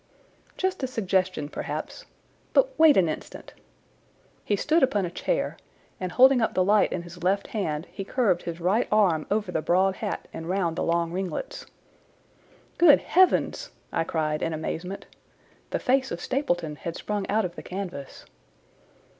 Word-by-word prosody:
"Just 375 -3 -1
a 260 - 0
suggestion, 190 - -1
perhaps. - - -6 0.5
But - - +3
wait 315 -2 +7
an 185 -3 +4
instant!" 155 - -7 0.9
He 205 - +1
stood 315 +11 +2
upon 205 -7 +2
a 170 - -5
chair, - - -2 0.4
and, 185 -1 -3
holding 260 +2 +6
up 220 - 0
the 185 - +3
light 210 +3 +3
in 170 - -3
his 175 0 -12
left 195 +2 +1
hand, 160 -7 -3
he 195 - -5
curved 195 -5 +1
his 170 0 -6
right 190 +8 +1
arm 190 -8 +3
over 205 -2 0
the 160 - -1
broad 185 +3 +2
hat - - -4
and 165 +1 -6
round 180 -3 0
the - - -3
long 170 0 0
ringlets. 195 - -4 1.1
"Good 330 -4 +8
heavens!" 370 +1 +2 0.2
I 165 - +1
cried 155 -2 -1
in 165 - -1
amazement. 170 +4 -5 0.6
The - - -1
face 265 0 +1
of 170 - -4
Stapleton 175 - -1
had 170 +2 -5
sprung 205 -2 -3
out 215 0 +2
of 175 - -5
the - - -7
canvas. 180 -8 -7
190 Hz, 165 wpm, -26 LUFS, 170-225 Hz, 1.1 s, Good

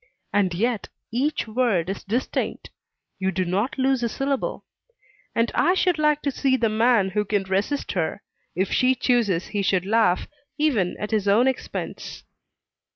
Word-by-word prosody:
And 190 -4 +2
yet 230 +3 -1 0.2
each 265 +3 0
word 215 -7 +1
is 195 +1 -4
distinct; 235 +6 -2 0.5
you 190 0 0
do 185 -1 -1
not 200 +10 -1
lose 265 -1 +2
a 235 - 0
syllable. 270 +2 -2 0.7
And 230 0 +1
I 360 - +3
should 360 -4 +2
like 300 -1 +2
to 280 - 0
see 265 0 +1
the 230 -3 +1
man 220 -2 +3
who 210 +2 +1
can 205 -1 0
resist 195 +9 -1
her, 170 -5 -2 0.3
if 190 +2 0
she 255 +1 +3
chooses 235 -9 +1
he 205 - -1
should 185 -2 +1
laugh, 205 -4 +2 0.3
even 255 - +1
at 210 - -4
his 210 -2 0
own 220 +6 +4
expense. 265 - -4
225 Hz, 160 wpm, -24 LUFS, 195-260 Hz, 0.7 s, own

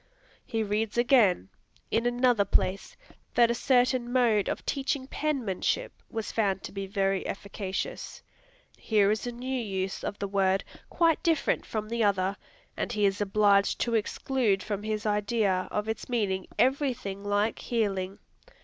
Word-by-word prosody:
He 225 -4 -2
reads 215 +2 -1
again, 235 - +4 0.4
in 230 +1 +2
another 245 -3 +3
place, 200 - 0 0.4
that 235 -1 +5
a - - +2
certain 250 0 +2
mode 235 -5 +3
of - - -4
teaching 275 -1 -1
penmanship 275 - -1 0.2
was 225 -2 -4
found 195 -4 0
to - - -6
be 195 -1 -5
very 195 -1 0
"efficacious." 195 -1 -5 0.5
Here 210 -2 +2
is 215 +3 -2
a - - -2
new 255 +2 -3
use 190 -2 -3
of 205 - -3
the 200 - -3
word, 195 -1 +1 0.3
quite 330 -2 +2
different 330 -4 +1
from 215 -1 -3
the 230 +1 0
other, 195 -1 +1 0.4
and - - -3
he 210 -3 +1
is 200 +1 +1
obliged 200 0 +3
to 235 - 0
exclude 220 -2 0
from 205 -2 -3
his 215 +1 -3
idea 205 -2 +1
of 210 +1 -2
its 220 +3 -4
meaning 200 -6 -1
every 265 0 +2
thing 200 -4 -7
like 205 +2 0
"healing." 195 -5 -1
215 Hz, 155 wpm, -28 LUFS, 195-245 Hz, 0.5 s, that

